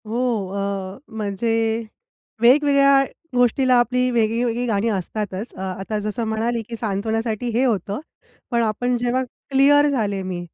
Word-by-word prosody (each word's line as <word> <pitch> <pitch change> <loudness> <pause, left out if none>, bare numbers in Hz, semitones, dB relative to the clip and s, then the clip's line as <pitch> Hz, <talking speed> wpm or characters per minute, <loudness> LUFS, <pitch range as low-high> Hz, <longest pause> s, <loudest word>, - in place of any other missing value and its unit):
हो. 230 -3 -1
अ, 195 -1 -3 0.2
म्हणजे 215 +1 -1 0.9
वेगवेगळ्या 275 +2 +5 0.3
गोष्टीला 250 +1 +3
आपली 250 +1 +1
वेगळी-वेगळी 235 +1 0
गाणी 220 -1 0
असतातच. 205 +1 -4
अ, - - -11 0.2
आता 210 +2 -3
जसं 215 +3 -3
म्हणाली, 225 +2 -1
की 235 - -4
सांत्वनासाठी 220 +2 -2
हे 255 - +3
होतं, 205 -3 -1 0.5
पण 235 -1 +2
आपण 245 +3 0
जेव्हा 245 +2 0 0.3
क्लिअर 285 +2 +5
झाले 210 -8 -1
मी. 185 -1 -4
230 Hz, 130 wpm, -22 LUFS, 205-245 Hz, 0.9 s, वेगवेगळ्या